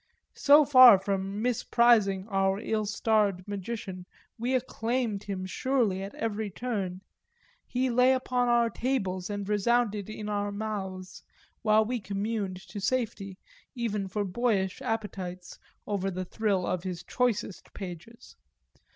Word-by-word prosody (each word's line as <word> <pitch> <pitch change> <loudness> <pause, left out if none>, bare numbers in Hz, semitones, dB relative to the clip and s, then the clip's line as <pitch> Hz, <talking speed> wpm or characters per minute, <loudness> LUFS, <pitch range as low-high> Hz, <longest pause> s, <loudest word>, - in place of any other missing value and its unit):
So 295 +1 +6
far 255 -6 +9
from 195 +2 -3
misprizing 230 -5 +3
our 195 -2 +1
ill 215 -1 -1
starred 205 -3 +1
magician 195 -2 -6 0.3
we 245 +3 -1
acclaimed 235 -4 -2
him 190 -2 -4
surely 225 -2 0
at 195 +1 -7
every 220 -1 -2
turn; 195 -4 -4 0.7
he 255 0 0
lay 250 +2 +5
upon 250 -1 0
our 235 -1 +3
tables 195 -8 -2
and 205 -1 -4
resounded 210 0 +1
in 215 -1 -6
our 205 -1 -1
mouths, 195 -3 -5 0.4
while 215 0 +4
we 245 +2 -2
communed 200 -2 -3
to 205 - -6
satiety, 200 -4 -2 0.4
even 210 -5 -2
for 205 +2 -2
boyish 195 -2 0
appetites, 190 -6 -5 0.3
over 195 -2 -1
the 185 0 -4
thrill 200 -2 0
of 180 - -1
his 180 -1 -5
choicest 220 -6 -2
pages. 190 +4 -9
210 Hz, 130 wpm, -28 LUFS, 190-235 Hz, 0.7 s, far